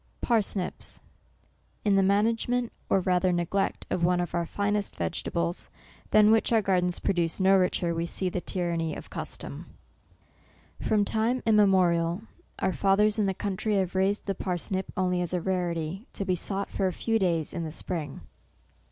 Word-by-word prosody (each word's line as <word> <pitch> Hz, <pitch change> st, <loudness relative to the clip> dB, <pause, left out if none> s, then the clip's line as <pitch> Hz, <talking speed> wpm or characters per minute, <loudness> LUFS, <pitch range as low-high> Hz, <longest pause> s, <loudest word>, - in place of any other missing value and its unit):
PARSNIPS. 205 Hz, -5 st, -1 dB, 0.9 s
"In 205 Hz, -1 st, +4 dB
the 195 Hz, -, +5 dB
management, 225 Hz, +5 st, +1 dB, 0.2 s
or 195 Hz, -, +3 dB
rather 180 Hz, 0 st, +2 dB
neglect 175 Hz, +3 st, -1 dB
of 170 Hz, -, 0 dB
One 175 Hz, +1 st, +3 dB
of 175 Hz, -, -3 dB
our 170 Hz, -1 st, -1 dB
finest 205 Hz, +1 st, -1 dB
vegetables, 85 Hz, 0 st, -2 dB, 0.4 s
than 215 Hz, 0 st, +6 dB
which 225 Hz, +1 st, +3 dB
our 225 Hz, -2 st, +4 dB
gardens 180 Hz, -2 st, +1 dB
produce 170 Hz, -2 st, 0 dB
no 190 Hz, +1 st, +5 dB
richer, 180 Hz, -2 st, +1 dB
we 165 Hz, +1 st, -2 dB
see 185 Hz, -, -2 dB
the 180 Hz, 0 st, -2 dB
tyran 175 Hz, -2 st, -2 dB
ny 165 Hz, -1 st, -2 dB
of -, -, -10 dB
custom. -, -, -6 dB, 0.6 s
" -, -, -25 dB
From 210 Hz, -2 st, +3 dB
time 225 Hz, +5 st, 0 dB
immemorial, 185 Hz, -4 st, +3 dB, 0.3 s
our 190 Hz, -, 0 dB
fathers 200 Hz, +7 st, +3 dB
in 205 Hz, -, +2 dB
the 190 Hz, -, -1 dB
country 205 Hz, +2 st, -1 dB
have 190 Hz, -2 st, 0 dB
raised 190 Hz, +2 st, +1 dB
the 195 Hz, -, -1 dB
parsnip 185 Hz, +1 st, -3 dB
only 180 Hz, -1 st, +1 dB
as 175 Hz, 0 st, -1 dB
a -, -, +1 dB
rarity, 175 Hz, +2 st, -2 dB
to 200 Hz, -, -4 dB
be 185 Hz, -, +1 dB
sought 195 Hz, +3 st, -3 dB
for 195 Hz, -, 0 dB
a 185 Hz, -, -2 dB
few 225 Hz, +4 st, 0 dB
days 170 Hz, -5 st, 0 dB
in 170 Hz, -, -3 dB
the 160 Hz, -, -4 dB
spring. 155 Hz, -3 st, -4 dB
190 Hz, 170 wpm, -27 LUFS, 175-205 Hz, 0.9 s, than